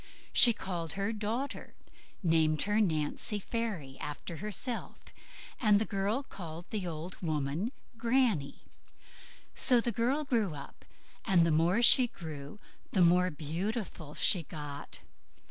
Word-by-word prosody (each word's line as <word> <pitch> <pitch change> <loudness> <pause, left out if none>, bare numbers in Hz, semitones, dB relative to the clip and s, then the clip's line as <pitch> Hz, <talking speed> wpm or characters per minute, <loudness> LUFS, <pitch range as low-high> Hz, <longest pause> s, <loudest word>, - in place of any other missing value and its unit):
She 240 - +9
called 175 -7 -5
her 200 +3 -2
"daughter", 225 +6 -4 0.5
named 160 -3 +3
her 210 +2 +2
"Nancy 160 +3 0
Fairy", 200 - -4
after 150 +3 -6
herself, 210 +5 -4 0.6
and 210 -4 +4
the 220 - 0
girl 205 +7 -1
called 170 -8 -9
the 205 -5 -2
old 165 +2 -6
woman 155 - -2 0.3
"Granny". 230 - +1 0.9
So 250 -2 +5
the 235 +1 0
girl 250 +7 0
grew 225 - 0
up, 140 - -11 0.4
and 175 -3 +4
the 165 - +2
more 170 +9 +2
she 250 +1 +7
grew 155 -6 -9 0.4
the 185 - +4
more 180 +2 +4
beautiful 165 +1 -5
she 185 - +4
got. 145 -2 -8
185 Hz, 130 wpm, -31 LUFS, 160-225 Hz, 0.9 s, She